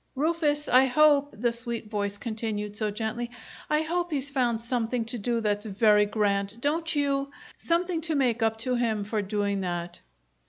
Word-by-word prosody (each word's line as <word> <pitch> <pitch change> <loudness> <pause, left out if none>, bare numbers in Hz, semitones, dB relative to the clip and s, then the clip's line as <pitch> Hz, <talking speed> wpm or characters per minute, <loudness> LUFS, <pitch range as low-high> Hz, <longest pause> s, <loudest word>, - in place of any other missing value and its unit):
"Rufus, 295 0 +1
I 255 +1 +6
hope," 285 0 +4
the 235 +2 +1
sweet 235 -2 -3
voice 205 -1 -2
continued, 215 -2 -4
so 215 -1 -1
gently, 220 +3 -3 0.4
"I 300 +1 +2
hope 350 +2 -1
he's 285 -3 -1
found 245 -4 +1
something 235 0 -1
to 230 +1 -4
do 235 +2 0
that's 210 0 0
very 210 0 +4
grand! 205 0 0
Don't 315 +5 0
you? 280 -1 0 0.3
Something 340 0 0
to 315 - +1
make 250 -4 +1
up 225 0 +1
to 255 - 0
him 230 -4 0
for 210 +1 -2
doing 200 0 -1
that!" 175 -1 -4
235 Hz, 170 wpm, -27 LUFS, 210-280 Hz, 0.4 s, I